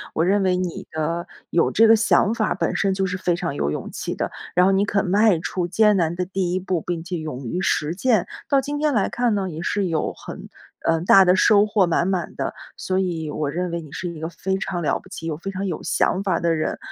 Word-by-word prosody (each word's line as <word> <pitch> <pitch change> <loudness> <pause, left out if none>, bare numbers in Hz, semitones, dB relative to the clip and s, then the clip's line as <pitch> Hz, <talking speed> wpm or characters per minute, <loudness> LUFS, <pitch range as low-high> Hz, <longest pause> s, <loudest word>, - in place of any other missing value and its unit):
我 160 - +2
认 200 +3 +3
为 185 -1 +2
你 180 -2 -4
的 165 +2 -2 0.2
有 170 - +3
这 225 +1 +5
个 225 - +7
想 220 -1 +3
法 220 -2 0
儿 - - 0
本 - - -1
身 195 - +1
就 190 0 0
是 185 -1 -2
非 175 -2 +1
常 170 -4 -3
有 70 - -1
勇 75 - -4
气 - - -4
的， - - -3 0.2
然 180 - +5
后 195 - +4
你 195 +1 +3
肯 205 -1 0
迈 200 0 +4
出 175 +1 -2
艰 210 +3 +4
难 170 -3 +1
的 180 +1 -2
第 185 -1 -2
一 185 - 0
步， 185 -2 -2
并 170 -1 -4
且 180 +1 -4
勇 150 -5 -6
于 175 +10 -2
实 155 -4 0
践。 215 +1 +2 0.2
到 280 - +4
今 290 +2 -4
天 300 -3 +1
来 205 - +2
看 240 -3 0
呢， 195 -2 -1
也 160 +1 -6
是 200 +3 -1
有 165 -3 -1
很， - - -10 0.4
嗯， 165 +1 +1
大 195 +1 +8
的 180 0 +4
收 205 +2 +5
获 205 -2 +3
满 170 +1 +1
满 185 -3 -2
的。 - - -3 0.2
所 185 - -2
以 170 -5 -1
我 150 -1 -2
认 180 +2 -2
为 170 0 -3
你 150 - -13
是 180 - -4
一 170 -2 -8
个 160 - -3
非 190 +3 -3
常 185 -2 -3
了 155 - +1
不 - - -16
起 170 -3 -7
又 155 -2 -3
非 195 +4 -5
常 195 +1 -3
有 175 - -4
想 190 - +1
法 185 -4 0
的 170 -1 +1
人， 155 - -2
180 Hz, 280 characters per minute, -22 LUFS, 170-195 Hz, 0.4 s, 大